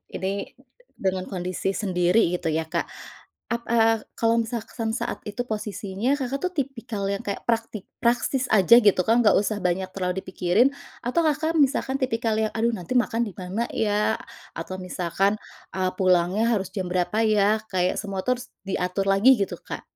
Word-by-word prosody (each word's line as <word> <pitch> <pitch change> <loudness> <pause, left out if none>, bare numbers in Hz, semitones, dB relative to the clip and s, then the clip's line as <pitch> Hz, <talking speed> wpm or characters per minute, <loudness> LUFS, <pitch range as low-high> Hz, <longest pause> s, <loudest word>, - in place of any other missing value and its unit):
ini 195 +1 -3 0.4
dengan 185 -1 -2
kondisi 185 +1 -3
sendiri 180 -1 +2
gitu - - -4
ya, 160 0 0
Kak, 160 - -2 0.6
ap 235 0 -2
eee, 225 -1 +3
kalau 230 0 +2
misalkan 225 0 -4
saat - - -4
itu 210 +4 -4
posisinya, 210 +2 -2
Kakak, 270 -1 -2
tuh 365 +5 -3
tipikal 250 - -4
yang 200 0 -3
kayak 200 - -3
praktik 225 -3 -1
praktis 245 +2 +1
aja 215 +3 +7
gitu 205 -6 +5
kan 230 +5 +3
nggak 210 - +6
usah 210 +1 -1
banyak 185 0 -1
terlalu 185 0 -2
dipikirin 185 +8 +2 0.3
atau, 320 +8 +1
Kakak, 315 +2 +1
misalkan 275 -2 +2
tipikal 230 -4 0
yang, 220 -1 0
aduh 230 +1 +1
nanti 180 +5 -5
makan 235 -1 +2
di 205 - -7
mana 190 +6 -3
ya? 210 -1 +1 0.4
Atau 185 - -6
misalkan, 185 +2 0 0.4
eee, 185 -1 0
pulangnya 185 +3 +3
harus 195 -3 -1
jam 190 -2 -4
berapa 195 +5 +1
ya? 210 0 +3 0.2
Kayak 180 0 +1
semua 195 -2 -3 0.5
diatur 190 +1 -1
lagi 200 +7 +6
gitu, 200 -6 -2
Kak. - - -6
210 Hz, 160 wpm, -25 LUFS, 185-235 Hz, 0.6 s, aja